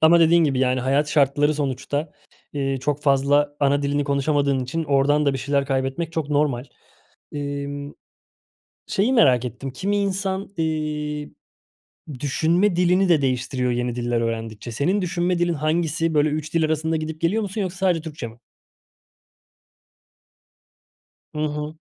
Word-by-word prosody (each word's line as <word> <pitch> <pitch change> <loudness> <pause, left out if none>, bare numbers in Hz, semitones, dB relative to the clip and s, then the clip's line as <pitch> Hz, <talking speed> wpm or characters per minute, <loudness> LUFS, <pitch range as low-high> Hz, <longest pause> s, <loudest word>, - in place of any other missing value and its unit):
ama 170 +2 +6
dediğin 165 0 +5
gibi, 135 -3 +1
yani, 130 -1 +2
hayat 140 +4 +1
şartları, 145 0 +2
sonuçta, 145 +2 -2 0.4
ııı, 135 -1 -1
çok 145 +2 -2
fazla 145 +1 +2
ana 140 0 +2
dilini 145 0 0
konuşamadığın 140 -1 +1
için 160 +6 -3
oradan 145 +1 +2
da 140 - +3
bir 135 - -3
şeyler 140 +1 0
kaybetmek 135 +5 -2
çok 155 -3 -3
normal. 145 -4 +1 0.7
Emm, 145 0 -4 1.0
şeyi 215 +7 +1
merak 130 - +4
ettim, 125 +3 -6
kimi 195 +10 -2
insan, 195 -1 -1
iii, 150 -2 -2 0.9
düşünme 170 +7 +2
dilini 180 +1 +3
de 155 -4 +4
değiştiriyor 130 -1 0
yeni 120 0 -1
diller 120 -1 -1
öğrendikçe. 115 0 -4
Senin 180 - 0
düşünme 175 0 0
dilin 175 -1 +1
hangisi? 160 +1 0
Böyle, 150 0 +3
3 155 +2 -4
dil 165 -1 +3
arasında 160 +1 0
gidip 155 0 -4
geliyor 200 +7 +1
musun 200 +2 -3
yoksa 185 -1 -4
sadece 180 -3 +1
Türkçe 155 -5 -6
mi? 115 +1 -13 3.0
Hı - - -5
hı. 150 +1 -3
150 Hz, 145 wpm, -23 LUFS, 135-165 Hz, 3.0 s, ama